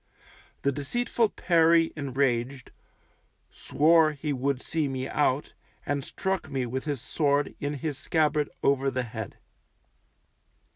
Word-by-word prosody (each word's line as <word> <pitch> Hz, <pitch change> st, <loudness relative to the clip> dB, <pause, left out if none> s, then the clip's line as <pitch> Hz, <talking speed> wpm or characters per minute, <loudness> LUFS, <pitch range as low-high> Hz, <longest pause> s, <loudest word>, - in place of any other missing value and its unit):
The 140 Hz, -, +3 dB
deceitful 225 Hz, -, 0 dB
Perry 165 Hz, -2 st, +3 dB
enraged, 130 Hz, -2 st, -1 dB, 0.8 s
swore 155 Hz, +1 st, +3 dB
he 150 Hz, 0 st, -3 dB
would 135 Hz, 0 st, -1 dB
see 155 Hz, +1 st, -1 dB
me 130 Hz, -1 st, -3 dB
out, 145 Hz, -1 st, 0 dB, 0.3 s
and 145 Hz, -1 st, -1 dB
struck 190 Hz, -1 st, -3 dB
me 135 Hz, -3 st, -1 dB
with 130 Hz, +2 st, -4 dB
his 145 Hz, -3 st, -2 dB
sword 145 Hz, +3 st, 0 dB
in 145 Hz, +1 st, -2 dB
his 145 Hz, 0 st, -4 dB
scabbard 150 Hz, -3 st, +1 dB
over 140 Hz, 0 st, +2 dB
the 130 Hz, -1 st, -2 dB
head. 110 Hz, -2 st, -7 dB
140 Hz, 125 wpm, -27 LUFS, 130-155 Hz, 0.8 s, The